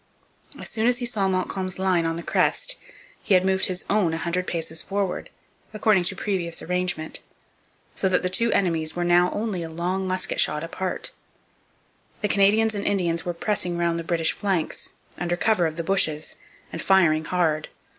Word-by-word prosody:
As - - -7
soon 225 +1 0
as 245 0 +3
he 245 - -3
saw 215 -5 +1
Montcalm's 185 0 -2
line 185 -3 +2
on 165 - -1
the 170 - -6
crest - - +1 0.5
he 195 - +3
had 185 0 +4
moved 190 0 +2
his 185 -1 -3
own 190 -6 +2
a - - -2
hundred 175 +2 -2
paces 160 -1 -2
forward, 195 -2 -2 0.5
according 210 -4 +3
to 195 - +1
previous 180 -4 -2
arrangement; 180 -3 -1 0.7
so 190 - +1
that 185 - +2
the - - +2
two 230 +5 +2
enemies 165 -4 +1
were 175 - -1
now 175 +1 +4
only 210 -4 -2
a 165 - -5
long 180 +4 -2
musket 185 0 -1
shot 150 +1 +1
apart. 180 +2 -4 1.1
The 210 - +2
Canadians 210 +3 +4
and 200 -1 -3
Indians 170 -4 +1
were 175 - -1
pressing 180 -2 -1
round 170 -1 +1
the - - -4
British 165 -1 +1
flanks, 190 -6 -2 0.3
under 175 0 -1
cover 200 -4 +2
of 155 - -5
the 170 - -3
bushes, 160 -5 +1 0.4
and 165 - -3
firing 160 -5 +4
hard. 160 -3 0
180 Hz, 180 wpm, -24 LUFS, 170-195 Hz, 1.1 s, had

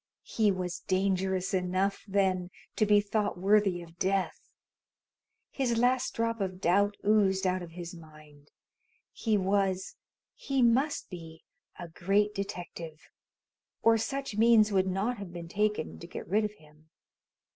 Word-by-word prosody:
He 215 -2 +2
was 180 -2 -3
dangerous 190 0 0
enough, 185 +2 0
then, 190 -2 +1 0.3
to 215 - +2
be 205 0 +5
thought 205 -1 -1
worthy 195 -2 +2
of 170 0 -16
death? 190 -3 0 1.1
His 245 -4 0
last 250 +2 +1
drop 230 -1 -1
of 185 -1 -3
doubt 200 +3 +2
oozed 195 -3 +3
out 185 0 +1
of 170 -2 -9
his 175 0 -7
mind. 155 -3 -15 0.6
He 220 -2 0
was 190 -1 0 0.4
he 270 -2 -1
must 260 +4 +2
be 165 -2 -10 0.3
a 175 - -7
great 195 +5 +1
detective, 175 -5 -7 0.7
or 225 0 +5
such 275 -1 -3
means 220 -1 +5
would 190 -1 +2
not 200 +5 -1
have 195 -3 -7
been 170 -1 -7
taken 210 +4 -1
to 170 - -9
get - - -8
rid 210 +3 +2
of 210 - -4
him. 155 -3 -22
195 Hz, 145 wpm, -29 LUFS, 180-210 Hz, 1.1 s, be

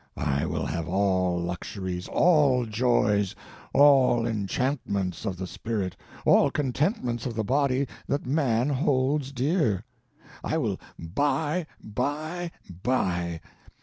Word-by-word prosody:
I 70 -2 0
will - - -2
have 80 +1 -3
all 95 -2 +1
luxuries, 90 +1 -4
all 145 -8 +4
joys, 105 -3 +1 0.4
all 135 -5 +5
enchantments 105 -3 -1
of 95 -3 -2
the 95 - -4
spirit, 95 -1 -3 0.3
all - - +5
contentments 130 - -1
of 120 - -5
the 110 - 0
body 135 +3 +1 0.2
that 140 - -1
man 130 -3 +1
holds 140 0 +1
dear. 135 - +1 0.6
I - - 0
will - - -1 0.2
buy, 145 - -1
buy, 155 +10 -3 0.3
buy! 85 -9 0
120 Hz, 115 wpm, -27 LUFS, 95-140 Hz, 0.6 s, all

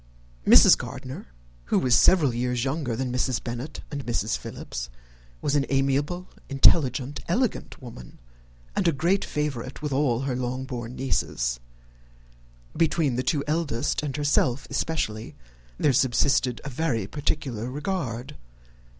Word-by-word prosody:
Mrs. - - +9
Gardiner, - - -7 0.4
who - - +1
was 125 -2 +2
several 150 -3 +5
years 125 0 -1
younger 135 -4 -1
than 125 +1 -2
Mrs. 125 -3 0
Bennet 120 +5 -5
and 145 -2 -4
Mrs. 115 -3 -1
Philips, - - -6 0.5
was 145 - +1
an 145 - +3
amiable, 140 +6 0 0.2
intelligent, 140 0 +3
elegant 230 +6 -1
woman, 110 - -11 0.6
and - - +1
a 165 - +4
great 175 +7 +1
favourite 140 -2 -3
with 150 - -2
her 135 -2 +1
Longbourn 125 -1 -4
nieces. - - -1 1.2
Between 155 -5 +2
the 125 - 0
two 140 +1 0
eldest 150 -4 0
and 150 -2 -3
herself 140 -3 +2
especially, 115 -7 -2 0.4
there 145 - +3
subsisted 125 -1 +2
a 145 - -5
very 125 -7 -1
particular 130 -2 -2
regard. 145 -3 -3
135 Hz, 125 wpm, -26 LUFS, 120-150 Hz, 1.2 s, Mrs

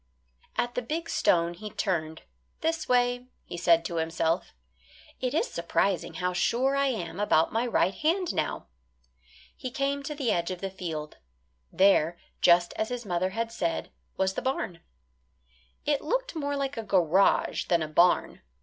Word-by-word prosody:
At 240 0 0
the 250 - -1
big 325 +7 -3
stone 170 0 +2
he 210 +5 -8
turned 160 -7 -2 0.4
this 325 0 -1
way 245 0 +2 0.2
he - - -7
said 170 -1 +3
to 170 - -3
himself. 165 - -1 0.6
"It 255 +2 -1
is - - +2
surprising 175 +2 0
how 180 0 -1
sure 255 +9 +1
I 275 0 +2
am 205 -8 -3
about 165 -6 +3
my 230 +2 +1
right 190 -5 +2
hand 340 - 0
now." - - -2 0.9
He 255 - -5
came 275 +2 -1
to 295 +1 -5
the 270 -5 0
edge 170 0 0
of 185 -1 -4
the 195 0 -4
field. 160 -5 -5 0.5
There, 175 -4 +4 0.2
just 175 0 +5
as 220 - -1
his 245 -2 -4
mother 180 0 0
had 230 +3 -3
said, 170 -7 -2 0.3
was 190 0 +1
the - - -3
barn. 260 -10 -2 1.1
It 290 -1 +1
looked - - -1
more 285 -2 -2
like 275 -1 -2
a - - -1
garage 190 -2 +3
than 170 -2 +2
a - - -3
barn. 175 +4 +3
200 Hz, 165 wpm, -28 LUFS, 175-270 Hz, 1.1 s, just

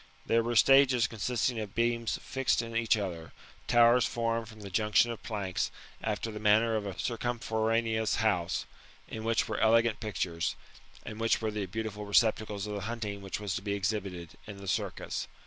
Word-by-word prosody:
There 115 0 +3
were 120 +1 -2
stages 130 0 +6
consisting 125 +1 -1
of 105 -3 -6
beams 115 0 0
fixed 135 -3 0
in 115 0 -7
each 115 0 +3
other, 85 -5 -5 0.3
towers 120 +1 +5
formed 115 -1 -1
from 110 -1 -12
the 100 -1 -8
junction 105 +4 +3
of 115 - -7
planks, 95 -5 -2 0.3
after 110 +1 -2
the 105 - -6
manner 110 +2 +4
of 105 -2 -2
a 95 - -6
circumforaneous 115 -2 0
house, 100 -6 0 0.4
in 110 - -6
which 115 0 +1
were - - -3
elegant 115 0 +3
pictures, 90 -6 -2 0.5
and 110 0 -7
which 115 0 +2
were 110 -1 -2
the 105 -2 -3
beautiful 105 +1 -4
iBoeptacles 105 -1 +2
of 105 - -5
the 100 - -3
hunting 105 -4 -4
which 95 0 -4
was 105 -2 -3
to - - -3
be 100 0 -2
exhibited 95 -5 -3
[in 105 -2 -8
the 100 0 -10
Circus. 95 - -2
110 Hz, 180 wpm, -30 LUFS, 100-115 Hz, 0.5 s, stages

